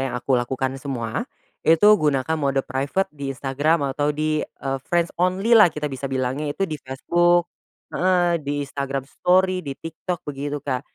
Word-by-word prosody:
yang - - -5
aku 130 +2 -2
lakukan 130 +1 0
semua, 120 -5 -3 0.3
itu 165 +3 +4 0.2
gunakan 150 +1 +1
mode 135 -1 0
private 140 +8 -1
di 140 -2 -6
Instagram 140 +2 0
atau 145 +2 0
di, 155 +1 0
eee, 135 0 -4
friends 175 -1 +1
only-lah 195 +4 +5
kita 150 -2 -4
bisa 135 +1 -4
bilangnya 130 +3 -2
itu 195 - +1
di 155 -6 -5
Facebook 175 +6 +1 0.4
heeh, 175 -2 +2
di 145 0 -2
Instagram 140 -1 -4
story, 185 +5 +2
di 140 -5 -6
TikTok 165 +2 -6
begitu 145 0 -4
Kak 130 -3 -1
145 Hz, 160 wpm, -23 LUFS, 135-170 Hz, 0.4 s, only-lah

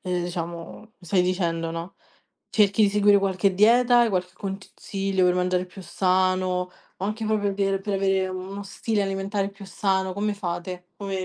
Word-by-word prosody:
ehm, 180 -1 -2
diciamo, 170 -1 -5
mi 220 0 -18 0.2
stai 180 +2 +3
dicendo, 170 -3 -1
no, 165 +3 -6 0.5
cerchi 210 0 +3
di 205 - +5
seguire 205 0 +5
qualche 190 -1 +1
dieta, 240 +4 +5
hai 235 - +4
qualche 180 -2 -1
consiglio 195 0 -3
per 180 0 +4
mangiare 180 0 +1
più 185 +1 -12
sano 185 +1 +1 0.5
o 190 - -5
anche 215 +2 -2
proprio 210 -2 +1
per 195 0 0
per 200 +1 -3
avere 195 -1 +1
uno 190 +2 -6
stile 205 +2 -2
alimentare 195 +1 -1
più 200 0 -12
sano? 190 0 0
Come 205 +2 -1
fate? 180 -1 -5
Come 195 -2 -3
195 Hz, 170 wpm, -25 LUFS, 180-200 Hz, 0.5 s, di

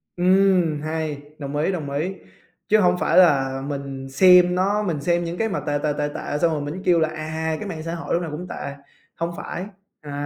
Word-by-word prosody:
Ừm! 180 -4 +3
Hay, 155 -2 -3 0.2
đồng 140 -1 -6
ý, 160 +6 +1
đồng 150 -6 -4
ý! 170 +7 -2 0.5
Chứ 215 +1 +4
hổng 180 -2 +3
phải - - +1
là 135 -6 +4
mình 135 -2 -5
xem 180 +4 +6
nó 200 +3 +1
mình 160 -7 -2
xem 175 +2 +1
những 170 +1 -4
cái 225 0 0
mà - - -2
tệ, 145 0 -1
tệ, 150 -1 +1
tệ, 145 0 0
tệ 145 - -3
xong 165 +1 +2
rồi 150 -2 -2
mình 150 +6 -5
kêu 175 -2 +4
là, 160 -1 +2
à, 160 0 -3
cái 210 - -5
mạng 160 -3 -6
xã 165 +1 -4
hội 165 - -4
lúc 170 - +1
nào 165 -3 -5
cũng 175 +4 -6
tệ, 140 0 -6 0.4
hông 170 +1 -2
phải. 185 - -5 0.4
À, 145 -1 -9
160 Hz, 230 wpm, -23 LUFS, 145-180 Hz, 0.5 s, xem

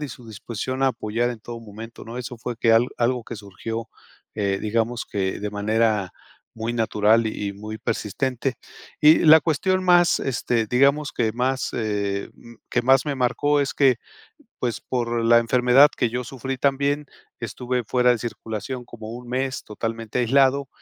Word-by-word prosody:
y 150 - -4
su 120 -1 -11
disposición 115 +4 -5
a 135 - +5
apoyar 120 0 -1
en 120 - -6
todo 115 +1 -8
momento, 115 +1 -10
¿no? 115 +2 -7
Eso 125 -1 -6
fue 120 0 -5
que 115 0 +3
al 115 +2 +4
algo 125 +1 +1
que 115 0 -8
surgió, 110 +3 -6 0.5
eh, 100 -2 0
digamos 115 +2 -1
que 95 -2 -2
de 105 - -3
manera 105 -1 0 0.4
muy 115 +1 -3
natural 110 0 +2
y 105 -2 -4
muy 105 +2 -7
persistente. 125 +4 -2 0.4
Y 150 +1 +7
la 160 0 +8
cuestión 185 +5 0
más, 175 -1 +4
este, 120 -3 -1
digamos 140 +5 +2
que 110 -2 0
más, 130 +3 -1
eh, 100 -3 -2 0.4
que 125 - 0
más 135 +3 +4
me 145 - -1
marcó, 145 +3 +1
es 140 - -1
que 135 -4 +4 0.6
pues, 120 -3 -2
por 120 -2 -2
la 115 0 +6
enfermedad 125 +4 +5
que 120 - +1
yo 125 +1 -2
sufrí 135 +1 -5
también, 140 +2 0 0.3
estuve 125 0 -3
fuera 125 +1 +3
de 120 - 0
circulación 120 +2 -5
como 110 -2 -9
1 120 +1 -9
mes 130 +2 -2
totalmente 115 +2 -4
aislado, 135 +3 +3
120 Hz, 165 wpm, -23 LUFS, 110-130 Hz, 0.6 s, la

